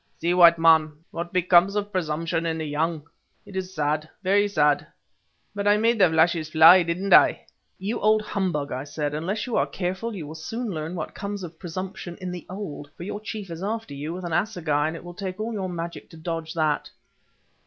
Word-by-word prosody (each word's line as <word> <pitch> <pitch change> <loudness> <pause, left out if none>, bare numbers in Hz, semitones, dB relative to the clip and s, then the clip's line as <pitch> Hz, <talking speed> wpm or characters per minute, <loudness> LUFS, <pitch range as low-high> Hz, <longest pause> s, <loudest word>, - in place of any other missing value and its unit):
See, 170 +2 +1
white 170 -2 +7
man, 160 -2 +5 0.2
what 170 +1 -5
becomes 180 +2 +4
of 205 0 -2
presumption 165 -2 -1
in 165 -1 -1
the 160 - -3
young. 155 +1 -2 0.4
It 195 - -12
is 185 0 -3
sad, 150 +1 -1
very 200 +2 +3
sad, 150 -7 +2 0.7
but 205 0 -2
I 205 0 +5
made 230 +1 +2
the 185 -3 +6
flashes 160 0 +2
fly, 165 +4 +8
didn't 175 +4 0
I?" - - +6 0.3
"You 205 +5 -3
old 215 +1 +3
humbug," 180 -9 -2
I 130 +1 -3
said, 145 0 -3
"unless 185 +8 -2
you 245 - -3
are - - +2
careful 190 +5 -3
you 170 -6 -6
will 150 - -8
soon 225 +9 -5
learn 160 +1 -4
what 160 - -5
comes 200 -1 -5
of 165 -2 -9
presumption 185 0 -6
in 185 -1 -5
the 180 -2 -8
old, 180 -7 -7
for - - -7
your 205 +2 -5
chief 210 -4 -6
is 165 +1 -6
after 220 -3 -3
you 145 +3 -5
with 180 +1 -6
an 170 - -4
assegai, 165 -6 0
and 160 - -4
it 165 - -9
will 175 0 -9
take 185 0 -6
all 225 +2 -3
your 190 -3 -3
magic 170 -1 -6
to 165 - -13
dodge 165 0 -5
that." 155 -2 0
175 Hz, 210 wpm, -25 LUFS, 160-195 Hz, 0.7 s, fly